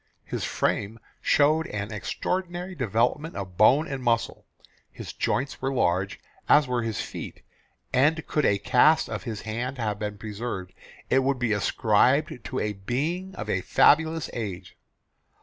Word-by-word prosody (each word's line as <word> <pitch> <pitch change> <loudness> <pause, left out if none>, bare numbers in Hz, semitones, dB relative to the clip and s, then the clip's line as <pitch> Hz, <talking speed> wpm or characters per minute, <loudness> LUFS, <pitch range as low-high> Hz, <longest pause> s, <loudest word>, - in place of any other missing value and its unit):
His - - -4
frame 105 +2 -1 0.2
showed 155 +2 +3
an 105 0 -4
extraordinary 180 - -3
development 125 - 0
of 95 -2 -6
bone 135 - +5
and 135 -2 -4
muscle; 115 -1 0 0.4
his - - -8
joints 135 +2 -2
were 135 +1 0
large, 95 -6 0 0.3
as 145 -2 +6
were 125 -1 0
his 115 -2 -3
feet; - - -7 0.5
and 150 +5 +3
could 150 - 0
a 100 - +3
cast 130 +9 +4
of - - -5
his 110 -4 -5
hand 120 +5 -4
have 105 -4 -2
been 105 -1 -4
preserved, 105 -3 -5 0.4
it 135 - +5
would 135 0 +1
be 120 -3 0
ascribed 115 +6 +2
to - - -4
a 105 -1 -1
being 155 - -3
of - - -6
a - - 0
fabulous 160 0 +3
age. 100 -7 -6
125 Hz, 150 wpm, -26 LUFS, 105-150 Hz, 0.5 s, as